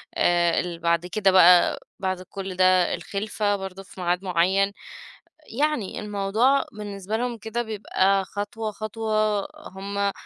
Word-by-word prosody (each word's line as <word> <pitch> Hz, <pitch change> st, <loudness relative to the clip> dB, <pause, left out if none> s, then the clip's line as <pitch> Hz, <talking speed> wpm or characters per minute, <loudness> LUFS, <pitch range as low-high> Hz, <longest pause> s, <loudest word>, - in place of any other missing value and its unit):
آآ، 175 Hz, -1 st, +3 dB
اللي 175 Hz, -2 st, -4 dB
بعد 170 Hz, +1 st, +1 dB
كده 195 Hz, +1 st, +2 dB
بقى 180 Hz, -1 st, +6 dB, 0.2 s
بعد 185 Hz, -1 st, -2 dB
كل 190 Hz, 0 st, -7 dB
ده 185 Hz, -1 st, +4 dB
الخِلفة 205 Hz, 0 st, -2 dB
برضه 190 Hz, -1 st, -7 dB
في 185 Hz, -, -12 dB
ميعاد 180 Hz, +2 st, 0 dB
معيّن، 190 Hz, +2 st, +2 dB, 0.9 s
يعني 300 Hz, -10 st, 0 dB
الموضوع 210 Hz, +6 st, +1 dB
بالنسبة 205 Hz, 0 st, -5 dB
لهم 240 Hz, -1 st, -2 dB
كده 220 Hz, +2 st, -3 dB
بيبقى 195 Hz, -3 st, 0 dB
خطوة 205 Hz, +4 st, -4 dB
خطوة، 215 Hz, 0 st, -1 dB, 0.4 s
هُم 200 Hz, +1 st, -2 dB
195 Hz, 130 wpm, -24 LUFS, 185-215 Hz, 0.9 s, بقى